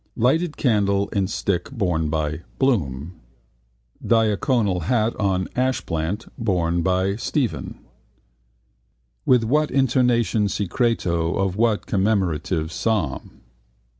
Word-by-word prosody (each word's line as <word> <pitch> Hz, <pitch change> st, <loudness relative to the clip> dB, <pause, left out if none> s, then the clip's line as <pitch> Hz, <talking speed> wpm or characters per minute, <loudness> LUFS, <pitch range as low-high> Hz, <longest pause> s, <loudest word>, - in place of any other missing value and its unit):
Lighted 155 Hz, +7 st, +1 dB
Candle 100 Hz, -5 st, +1 dB
in 100 Hz, -2 st, 0 dB
Stick 95 Hz, -2 st, -2 dB
borne 90 Hz, -, -1 dB
by 80 Hz, +1 st, -2 dB, 0.2 s
BLOOM 85 Hz, -, 0 dB, 0.9 s
Diaconal 110 Hz, -, +1 dB
Hat 115 Hz, 0 st, +1 dB
on 95 Hz, -3 st, 0 dB
Ashplant 105 Hz, -7 st, -1 dB
borne 85 Hz, -6 st, 0 dB
by 95 Hz, +2 st, +1 dB
STEPHEN 115 Hz, -, -2 dB, 1.5 s
With 125 Hz, -2 st, +5 dB
what 150 Hz, +6 st, +2 dB
intonation 120 Hz, -5 st, +2 dB
secreto 90 Hz, -5 st, 0 dB
of 95 Hz, -1 st, 0 dB
what 110 Hz, -1 st, +1 dB
commemorative 90 Hz, -5 st, 0 dB
psalm? 95 Hz, -10 st, -2 dB
100 Hz, 95 wpm, -22 LUFS, 85-115 Hz, 1.5 s, With